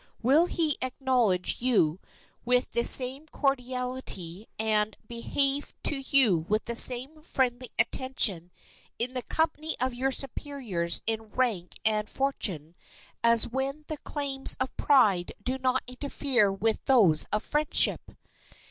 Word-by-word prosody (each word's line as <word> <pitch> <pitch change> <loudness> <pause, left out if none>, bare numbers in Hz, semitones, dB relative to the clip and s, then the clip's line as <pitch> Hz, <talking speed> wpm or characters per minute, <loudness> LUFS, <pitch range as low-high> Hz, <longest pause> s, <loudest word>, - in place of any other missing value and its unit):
Will 295 +8 +4
he 315 -5 +1
acknowledge 250 -9 0
you 195 -10 +1 0.4
with 250 0 0
the 235 - 0
same 265 +5 +3
cordiality 250 - -4
and 215 -1 -1
behave 275 +4 -2
to 290 - +4
you 255 -10 +3
with 215 +1 0
the 235 - -4
same 260 +6 +4
friendly 255 -5 -2
attention 205 -10 +3 0.5
in 245 +2 -3
the 255 - -3
company 315 +2 -2
of 255 0 -1
your 260 +2 -2
superiors 255 - -1
in 225 0 -3
rank 210 -6 -2
and 215 -1 0
fortune 185 - -2 0.5
as 230 -1 +4
when 270 +4 -4
the 310 - -4
claims 280 -2 -1
of 260 0 -2
pride 210 -11 +2
do 260 +1 -3
not 255 0 0
interfere 250 -4 -1
with 215 +3 -2
those 200 - +3
of 210 +1 -1
friendship? 300 0 +3
250 Hz, 130 wpm, -27 LUFS, 215-270 Hz, 0.5 s, Will